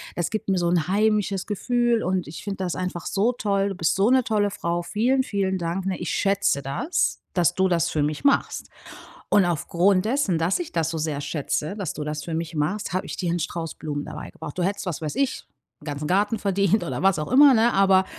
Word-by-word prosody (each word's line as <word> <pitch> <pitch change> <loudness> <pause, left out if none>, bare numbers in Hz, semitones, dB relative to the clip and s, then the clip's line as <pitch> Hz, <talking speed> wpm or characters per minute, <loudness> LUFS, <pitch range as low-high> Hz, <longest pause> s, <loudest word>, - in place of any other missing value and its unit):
das 175 - -1
gibt 215 -1 -4
mir 190 -2 +2
so 175 - +1
'n 175 -1 +1
heimisches 205 -1 +1
Gefühl 240 +2 +1
und 185 -1 -1
ich 150 - -8
finde 200 -1 -4
das 185 -3 -2
einfach 180 -2 -4
so 210 +5 +2
toll. 200 -4 0
Du 195 - -5
bist 165 -3 +1
so 200 +4 +3
'ne 260 -1 +4
tolle 210 -3 +1
Frau! 175 -3 -2
Vielen, 250 +8 +1
vielen 195 -4 -1
Dank, 175 +2 -3
ne? 185 - -1
Ich 175 - -3
schätze 195 -7 +1
das, 140 - -1 0.2
dass 175 -1 +2
du 190 0 +2
das 170 -3 +1
für 150 -2 0
mich 150 - -2
machst. 280 - +1 0.6
Und 205 -2 +5
aufgrund 175 +3 +2
dessen, 225 - +1
dass 165 +3 +1
ich 345 - -5
das 165 -2 0
so 165 - -3
sehr 155 -2 -2
schätze, 155 +4 -2
dass 195 -7 -4
du 150 - -5
das 150 0 -4
für 165 - -5
mich 165 +1 -3
machst, 165 +7 -1
habe 185 - -1
ich - - -6
dir 175 - -2
einen 175 +1 0
Strauß 165 0 -4
Blumen 145 -2 -4
dabei 150 0 -7
gebracht. 150 - -9
Du 180 - 0
hättest, 200 +3 -2
was 175 -4 -4
weiß 155 +4 -4
ich 275 -1 -1 0.4
'n - - -15
ganzen 145 0 -4
Garten 205 +5 +1
verdient 200 +1 +2
oder 175 - -4
was 195 -4 +3
auch 150 - -4
immer 280 +1 +8
ne? 235 0 +3
Aber 190 -1 +4
185 Hz, 235 wpm, -24 LUFS, 165-205 Hz, 0.6 s, immer